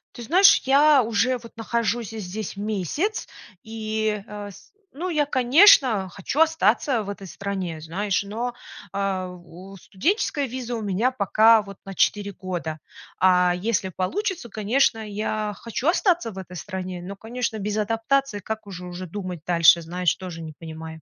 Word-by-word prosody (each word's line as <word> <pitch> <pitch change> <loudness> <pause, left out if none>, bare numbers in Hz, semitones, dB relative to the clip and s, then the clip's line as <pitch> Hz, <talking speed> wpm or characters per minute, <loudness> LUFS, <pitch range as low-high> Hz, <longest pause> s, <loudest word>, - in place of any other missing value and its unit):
Ты 240 - -8
знаешь, 375 - +6
я 280 +1 +6
уже, 230 +3 +1
вот, 230 0 -13
нахожусь 230 0 -1
здесь 210 -1 -6
месяц, 215 - -2 0.4
и, 220 -2 -2
э, 205 -1 -7
с - - -17 0.2
ну, 360 +5 -3
я, 300 -3 +1
конечно, 255 - +5
хочу 200 - -4
остаться 270 -6 +3
в 200 - -7
этой 200 -1 -7
стране, 185 -3 -5
знаешь, 190 +6 -1
но, 225 +5 -3
э, - - -9 0.4
о, 185 -1 -5
студенческая 285 - -1
виза 245 -1 -5
у 220 - -4
меня 205 +6 +1
пока 220 -1 +4
вот 200 -1 -11
на 195 -1 -8
4 205 -1 +1
года, 175 -5 -5 0.4
а 180 -1 +4
если 195 -1 -1
получится, 340 - -3
конечно, 225 +3 +1
я 210 0 -3
хочу 235 +5 -4
остаться 345 - +2
в 195 - -11
этой 180 -1 -8
стране, 185 -1 -5
но, 195 +3 -7
конечно, 225 +1 -4
без 210 +1 -3
адаптации 225 +3 0
как 220 +1 -6
уже 180 -2 -8
уже 180 +1 -7
думать 185 -2 -6
дальше, 170 -1 +6
знаешь, 175 +1 0
тоже 180 -3 -8
не 155 -1 -8
понимаю. 160 0 -9
210 Hz, 155 wpm, -24 LUFS, 185-240 Hz, 0.4 s, знаешь